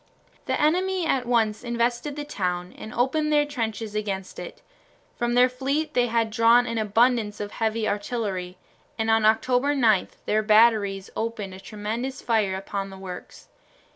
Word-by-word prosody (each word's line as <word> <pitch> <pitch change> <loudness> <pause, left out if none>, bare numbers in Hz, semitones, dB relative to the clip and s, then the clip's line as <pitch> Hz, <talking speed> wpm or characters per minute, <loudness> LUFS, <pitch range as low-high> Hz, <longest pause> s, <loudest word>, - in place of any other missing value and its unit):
The - - 0
enemy 365 +4 +1
at 260 -6 0
once 225 -3 +1
invested 240 +3 -1
the 295 - -4
town 180 -9 -3
and 220 - -9
opened 300 +6 0
their 295 -1 +4
trenches 225 -6 -4
against 200 -3 -4
it. - - -9 0.5
From 240 -1 -1
their 250 +1 +6
fleet 280 +5 -2
they 245 -2 +2
had 230 -1 0
drawn 230 +2 +5
an 230 -1 -2
abundance 220 0 +2
of 205 0 -5
heavy 220 0 -1
artillery, 200 -4 -3 0.4
and 225 0 +1
on 225 -1 +3
October 250 +6 +2
9 220 -7 +3 0.2
their 215 +1 +2
batteries 215 -3 +3
opened 220 -4 -3
a 190 - -10
tremendous 220 +6 -5
fire 215 -5 +1
upon 195 +1 -4
the 190 - -10
works. 185 -2 -9
225 Hz, 160 wpm, -25 LUFS, 210-245 Hz, 0.5 s, their